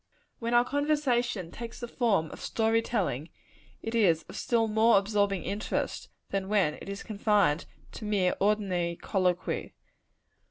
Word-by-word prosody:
When 235 +1 0
our 240 0 +5
conversation 250 - 0
takes 235 -1 -8
the 240 - -5
form 205 - +1
of - - -10
story 225 0 +1
telling, 175 - -2 0.5
it 225 - -4
is 180 -8 +3
of - - -12
still 230 -2 +1
more 220 +1 +5
absorbing 200 -2 +1
interest, 205 +2 -3 0.2
than 195 -1 -2
when 195 -8 +3
it - - -10
is 200 0 -5
confined 205 -6 +1 0.2
to 215 - -8
mere 195 -4 +2
ordinary 190 -4 +1
colloquy. 180 -3 -1
210 Hz, 145 wpm, -29 LUFS, 185-230 Hz, 0.5 s, our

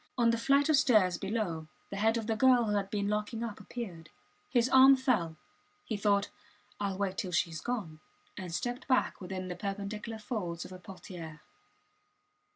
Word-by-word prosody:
On 235 -1 +4
the 230 - +1
flight 280 +4 +3
of 310 - +5
stairs 210 -10 +4
below 195 -6 -2 0.2
the 200 - -4
head 225 +3 +3
of 225 - -3
the 225 0 0
girl 250 +1 +5
who 210 - 0
had 200 -1 -1
been 200 -1 -1
locking 210 +2 -2
up 225 -3 -5
appeared. 175 -10 -7 0.4
His 245 -1 +3
arm 265 +1 +8
fell. 220 - 0 0.5
He 220 - -2
thought, 200 0 +1 0.5
Ill 195 -2 -1
wait 195 -1 -2
till 185 - -3
she 170 -1 +1
is 160 - -6
gone 200 -11 -4 0.4
and 185 -3 -6
stepped 245 +8 -3
back 255 -5 +1
within 185 0 -5
the 180 - -4
perpendicular 205 +4 -4
folds 195 -7 -4
of - - -10
a 185 - -9
portiere. 175 -4 -9
205 Hz, 180 wpm, -31 LUFS, 185-235 Hz, 0.5 s, arm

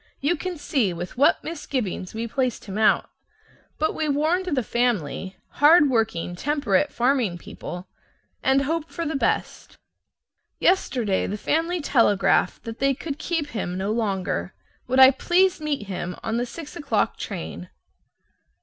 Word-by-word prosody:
You 295 +6 +1
can 360 +1 -5
see 245 -10 0
with 175 +1 -6
what 275 - +3
misgivings 260 - -4
we 225 +1 -2
placed 255 0 -2
him 195 -2 -7
out. 220 - +3 0.7
But 315 - 0
we 310 -1 -1
warned 315 +6 +1
the 280 -8 0
family 200 - -1 0.3
(hard 295 -1 +7
working 220 -7 0
temperate 265 -4 +1
farming 240 -7 +1
people) 175 +1 -8 0.5
and 270 +1 +3
hoped 320 +2 -2
for 335 - -4
the 310 - -2
best. 275 - -2 0.8
Yesterday 245 - +1
the 205 - -3
family 330 - 0
telegraphed 205 -10 +2
that 225 0 -7
they 275 0 +2
could 295 +1 -6
keep 330 -4 -2
him 185 -8 -3
no 195 +2 -1
longer. 190 - -2 0.3
Would 260 +1 +2
I 265 0 +10
please 355 +5 +2
meet 290 -8 -2
him 180 -2 -4
on 225 +1 -1
the 245 +1 -1
six 310 +6 -9
o'clock 330 -4 0
train? - - -6
260 Hz, 150 wpm, -24 LUFS, 205-305 Hz, 0.8 s, I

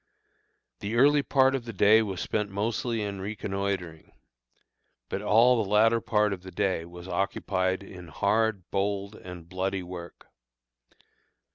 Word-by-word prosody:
The 105 +3 -4
early 145 +4 +5
part 135 -1 +3
of 130 -3 -2
the 115 - -6
day 105 +2 +5
was 95 -5 -3
spent 105 -1 -1
mostly 110 +3 -2
in 100 -2 -4
reconnoitring; 95 -5 -4 1.0
but 100 - -3
all 115 +3 +4
the 95 - -7
latter 115 +2 +4
part 105 -2 +1
of 95 - -7
the 95 - -10
day 95 -2 -1
was 90 +1 -11
occupied 95 0 -1
in 90 -3 -11
hard, 105 +4 0
bold, 100 +1 -1
and 90 -5 -10
bloody 95 +1 -2
work. 90 -1 -9
100 Hz, 140 wpm, -27 LUFS, 95-110 Hz, 1.0 s, early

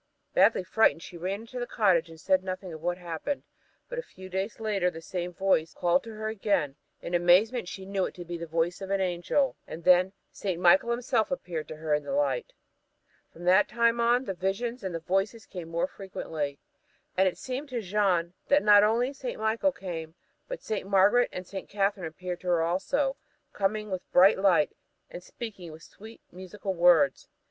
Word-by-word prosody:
Badly - - +4
frightened, 180 -2 +2
she - - -10
ran 185 +5 -3
into 240 +2 -8
the 245 - -3
cottage 180 -6 +2
and 165 -1 -12
said 185 +3 +2
nothing 185 -1 -5
of 155 - -9
what 175 +1 -1
had 180 - -16
happened; 170 - -3 0.4
but - - -4
a - - -1
few 185 - -13
days 190 +4 -3
later 205 -5 +1
the 165 - -9
same 175 +1 -4
voice 175 -3 +1
called 175 0 +3
out - - -8
to 225 - -8
her 215 0 -4
again. 195 -9 0 0.3
In 170 - -5
amazement 180 +6 +4
she 190 +1 -7
knew 195 -1 -1
it - - -7
to 175 - -8
be 175 +1 -5
the 170 0 -6
voice 165 +3 -1
of 190 - -6
an 195 0 +1
angel 185 +9 0
and 165 - -8
then 180 +2 +5 0.2
Saint 185 -4 -3
Michael 180 +6 +5
himself 235 -1 0
appeared 175 - -4
to 155 - -7
her 155 0 -2
in 150 - +2
the - - -4
light! 290 - 0 0.8
From 170 - -13
that 185 +3 +5
time 235 +1 +2
on 240 +2 +3
the 195 - -2
visions 200 +6 -2
and 185 -3 -3
the - - -2
voices 195 +6 -1
came 175 -3 -8
more 170 0 0
frequently. 160 - -5 0.6
And 190 +1 +4
it 185 - -1
seemed 270 +3 -5
to 250 -2 -2
Jeanne 185 -4 +1
that 285 +1 +4
not 205 -1 +7
only 235 +5 +2
St. 260 -3 -5
Michael 220 +6 +1
came, 165 -7 -7 0.3
but - - -6
St. 205 -3 -3
Margaret 200 +5 +4
and 185 - -6
St. 190 +1 -7
Catherine 195 -3 0
appeared 180 +2 -6
to 185 - -9
her 170 -2 +3
also, 270 - 0 0.4
coming 210 +1 -1
with 185 -1 -2
a - - -43
bright 190 +2 +6
light, 180 -6 +4 0.4
and 175 - -7
speaking 190 -4 -8
with 155 +1 -12
sweet 220 +2 -13
and - - -16
musical 190 +1 -5
words. 170 -6 +4
190 Hz, 205 wpm, -28 LUFS, 175-220 Hz, 0.8 s, not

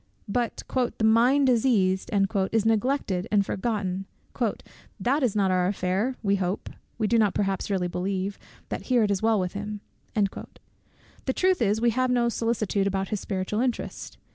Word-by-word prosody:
But 235 +3 -2 0.3
"the - - -2
mind 240 +6 +5
diseased" 220 -7 +2 0.4
is 220 -1 +1
neglected 225 -4 +1
and 205 -2 +3
forgotten 195 -3 -2 0.9
"that 275 +5 +1
is 245 -6 +1
not 195 -2 +2
our 180 -1 +2
affair; 195 +6 0
we 200 -1 +2
hope 185 +1 -3 0.3
(we 220 - 0
do 230 +2 +3
not 210 -3 +2
perhaps 195 -1 -1
really 190 -3 0
believe) 190 +2 -3 0.3
that - - -5
here 245 -3 +4
it 205 - +1
is 195 - 0
well 220 -1 +3
with 180 -1 -2
him." 210 +1 -5 0.4
The 210 +5 -5
truth 370 -5 +2
is, 210 -1 +2
we 235 +1 +3
have 255 +2 +1
no 240 -1 +2
solicitude 215 -4 0
about 195 -1 -1
his 210 - -1
spiritual 190 +2 -2
interest. 245 -1 -3
210 Hz, 165 wpm, -26 LUFS, 195-235 Hz, 0.9 s, mind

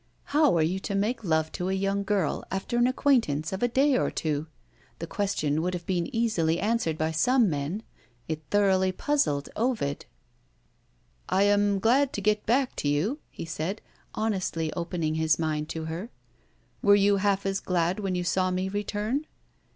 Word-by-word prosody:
How 295 - +4
are 160 - +3
you 180 +4 0
to 200 - -4
make 220 +4 0
love 160 -3 +1
to 180 +1 -3
a - - 0
young 195 +1 0
girl, 195 -6 0
after 195 +5 -3
an 240 +1 +4
acquaintance 230 - +1
of 190 - -4
a 245 - +3
day 270 +3 +3
or - - +1
two? 155 -1 -2 0.5
The 165 - -5
question 160 -6 -1
would 180 +2 -1
have 175 -1 -6
been 175 -3 -1
easily 200 -9 +1
answered 210 -6 0
by 160 +1 0
some 240 +5 +3
men. 150 +9 -3 0.4
It 155 -1 -3
thoroughly 190 -2 +3
puzzled 185 - 0
Ovid. 220 - -1 1.2
"I 195 - +3
am 205 0 +3
so - - -1
glad 260 +5 +3
to - - -2
get 210 +1 +1
back 255 +3 +2
to - - -1
you!" 170 - 0
he - - -7
said, 165 +6 -3 0.4
honestly 185 -7 -1
opening 170 -3 -2
his 160 -1 +3
mind 155 -2 -2
to 160 -1 -4
her. 165 +8 -5 0.7
"Were 205 0 +6
you 200 0 +4
half 200 0 +1
as 195 0 0
glad 180 +1 0
when 195 -3 -2
you 180 - -1
saw 185 +1 +1
me 185 +1 -1
return?" 210 +8 -2
190 Hz, 180 wpm, -27 LUFS, 160-215 Hz, 1.2 s, Were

